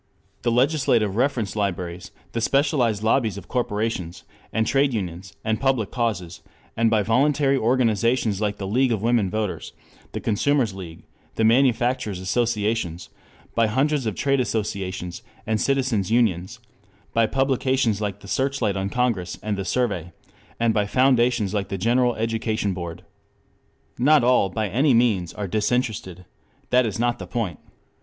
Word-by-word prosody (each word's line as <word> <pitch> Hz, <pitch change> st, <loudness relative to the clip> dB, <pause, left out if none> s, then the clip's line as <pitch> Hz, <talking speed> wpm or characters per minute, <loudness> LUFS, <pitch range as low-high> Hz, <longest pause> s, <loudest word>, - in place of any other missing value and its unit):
] -, -, -40 dB
the 120 Hz, -, +1 dB
legislative 125 Hz, -5 st, +2 dB
reference 120 Hz, -4 st, 0 dB
libraries, 90 Hz, -4 st, -3 dB, 0.2 s
the 115 Hz, -, -2 dB
specialized 125 Hz, -5 st, +1 dB
lobbies 110 Hz, -2 st, +1 dB
of -, -, -9 dB
corporations 105 Hz, -7 st, -2 dB, 0.3 s
and 110 Hz, 0 st, +1 dB
trade 135 Hz, +1 st, +2 dB
unions 90 Hz, -2 st, -5 dB
and 110 Hz, -1 st, 0 dB
public 130 Hz, -6 st, +1 dB
causes, 105 Hz, -9 st, -2 dB, 0.3 s
and 115 Hz, 0 st, +3 dB
by 110 Hz, -2 st, +2 dB
voluntary 135 Hz, +5 st, +2 dB
organizations 115 Hz, -3 st, +1 dB
like 105 Hz, -1 st, -1 dB
the 100 Hz, -, -5 dB
League 125 Hz, +6 st, +2 dB
of 110 Hz, -3 st, -1 dB
Women 115 Hz, -4 st, +2 dB
Voters, 110 Hz, -1 st, -3 dB, 0.4 s
the -, -, -3 dB
Consumers' 115 Hz, +1 st, +1 dB
League, 85 Hz, -3 st, -9 dB, 0.3 s
the 115 Hz, -, 0 dB
Manufacturers' 120 Hz, -3 st, +2 dB
Associations: 105 Hz, -3 st, -1 dB, 0.4 s
by 115 Hz, -1 st, +3 dB
hundreds 135 Hz, +3 st, +1 dB
of 105 Hz, -, -2 dB
trade 140 Hz, +7 st, +1 dB
associations, 95 Hz, -6 st, -3 dB, 0.2 s
and 110 Hz, -1 st, 0 dB
citizens' 130 Hz, -8 st, +1 dB
unions; 110 Hz, -2 st, +1 dB, 0.6 s
by 115 Hz, -1 st, +3 dB
publications 130 Hz, -4 st, +1 dB
like 100 Hz, -1 st, -3 dB
the 95 Hz, -, -12 dB
Searchlight 130 Hz, -3 st, 0 dB
on 95 Hz, 0 st, -2 dB
Congress 115 Hz, -8 st, -1 dB
and 105 Hz, -1 st, -1 dB
the 100 Hz, -, -3 dB
Survey; 95 Hz, -6 st, -1 dB, 0.5 s
and 115 Hz, -1 st, +2 dB
by 105 Hz, -1 st, +1 dB
foundations 120 Hz, -4 st, +2 dB
like 100 Hz, -2 st, -1 dB
the 95 Hz, -, -3 dB
General 120 Hz, +5 st, +2 dB
Education 110 Hz, -2 st, -1 dB
Board. 85 Hz, -2 st, -7 dB, 0.9 s
Not 145 Hz, +2 st, +5 dB
all 125 Hz, -5 st, +3 dB
by 110 Hz, +2 st, -2 dB
any 130 Hz, +7 st, +3 dB
means 105 Hz, -8 st, +2 dB
are 105 Hz, -2 st, -5 dB
disinterested. 105 Hz, -3 st, -1 dB, 0.5 s
That 125 Hz, -1 st, +4 dB
is 105 Hz, -, -4 dB
not 120 Hz, +1 st, 0 dB
the -, -, -7 dB
point. 110 Hz, -7 st, -3 dB
110 Hz, 150 wpm, -23 LUFS, 100-125 Hz, 0.9 s, Not